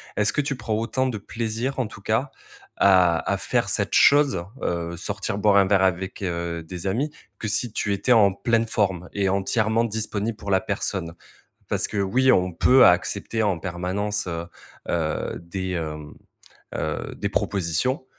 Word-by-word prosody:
est-ce 105 0 +2
que 145 - 0
tu 140 -1 -2
prends 110 -3 -3
autant 120 +4 0
de 115 -4 -3
plaisir, 115 +5 -3
en 120 - 0
tout 100 - -12
cas, 110 +7 0 0.5
à 90 -4 +4
à - - +1
faire - - 0
cette - - 0
chose, 140 -11 +5 0.2
heu, 85 0 -2
sortir 100 - -3
boire 105 -1 +4
un 100 - +6
verre 95 -1 +3
avec, 95 +1 -1
heu, 85 -2 -3
des 90 +3 -6
amis, 140 +10 -1 0.3
que 110 - -3
si 105 +3 0
tu 105 -2 -1
étais 110 +6 0
en 105 -4 +6
pleine 115 +2 +1
forme 95 -5 -1
et 100 -2 +1
entièrement 110 +4 +1
disponible 110 0 -2
pour 100 -2 -6
la 95 - +4
personne? 95 -5 -3 0.6
Parce - - +1
que 105 - -5
oui, 130 +7 +3
on 90 0 +2
peut 125 +9 +6
accepter 100 +5 +2
en 95 -5 0
permanence, 95 +4 -2
heu 85 0 -4 0.4
heu, 80 -2 -2
des 95 +2 -5
hem 75 -3 -5 0.6
heu, - - -3
des - - -2
propositions, 100 - -1
100 Hz, 170 wpm, -24 LUFS, 90-115 Hz, 0.6 s, un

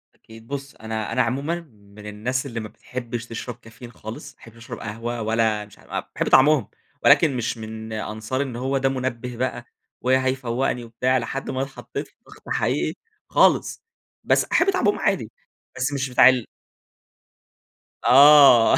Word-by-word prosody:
أكيد 115 0 -16
بُص 140 0 -6
أنا 110 -1 -5
أنا 130 - +2
عمومًا 140 +8 -1
من 105 0 -16
الناس 120 +6 -3
اللي 120 -4 -5
ما 110 - -5
بتحبش 120 -1 -6
تشرب 115 +1 -6
كافيين 115 +1 -13
خالص، 115 +5 -9
ما - - -42
أحبش 115 0 -15
أشرب 115 0 -9
قهوة 115 +2 -5
ولا 110 -1 0
مش 105 - -19
ع - - -7
أ - - -7
باحب - - -1
طعمهم 135 -4 +5 0.4
ولكن 145 -5 +5
مش 120 0 -2
من 110 0 -7
أنصار 110 +4 -3
إن 135 -4 -4
هو 130 +3 -1
ده 135 0 +1
مُنبِه 125 -2 -4
بقى، 125 -1 -3 0.4
وهيفوقني 130 -1 0
وبتاع 125 +3 0
لحد 130 +3 -4
ما 130 0 -2
اتحطيت 135 0 -6
في - - -30
ضغط - - -15
حقيقي - - 0 0.3
خالص. - - +2 0.4
بس - - +3
أحب 390 - +2
طعمهم 210 - +1
عادي، 180 - 0 0.5
بس 130 +3 -1
مش 140 -1 -2
بتاع 125 0 +7
ال 125 -3 0 1.6
آه، 140 -3 +8
120 Hz, 160 wpm, -23 LUFS, 115-130 Hz, 1.6 s, آه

